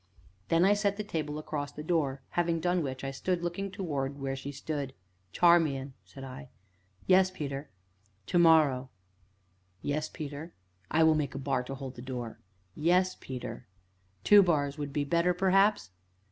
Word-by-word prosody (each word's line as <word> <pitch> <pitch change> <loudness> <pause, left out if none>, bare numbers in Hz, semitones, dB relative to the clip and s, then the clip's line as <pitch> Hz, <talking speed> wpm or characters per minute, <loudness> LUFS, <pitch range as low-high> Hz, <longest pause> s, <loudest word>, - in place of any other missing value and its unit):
Then 165 +2 +4
I 200 - +6
set 205 -1 0
the 210 - -3
table 155 -7 -3
across 145 -2 -4
the 150 - -8
door, 145 -5 0
having 170 -1 0
done 180 +1 +1
which 130 -3 -4
I 135 - -2
stood 175 +6 -2
looking 175 +3 -3
towards 145 -8 -3
where 135 -1 -3
she 135 +1 -6
yet 140 - -8
stood. 140 -3 -4 0.4
"Charmian," 150 - +3
said 135 - -11
I. 135 +2 -9 0.6
"Yes, 185 0 +5
Peter." 140 -5 -5 0.6
"To 175 - +1
morrow 150 -6 +5 0.5
" 90 0 -40
"Yes, 150 +1 -1
Peter?" 150 +2 -7 0.3
"I 160 +1 +3
will 160 0 +6
make 150 -3 -1
a - - -3
bar 130 -1 0
to 135 - -5
hold 135 -1 -7
the 120 - -10
door." 125 -3 -6 0.3
"Yes, 180 - +2
Peter." 125 -1 -7 0.6
"Two 205 -1 +8
bars 145 -6 +1
would 145 -2 -5
be 145 +1 0
better, 170 +5 +2
perhaps?" 195 - +3
150 Hz, 170 wpm, -30 LUFS, 135-175 Hz, 0.6 s, Two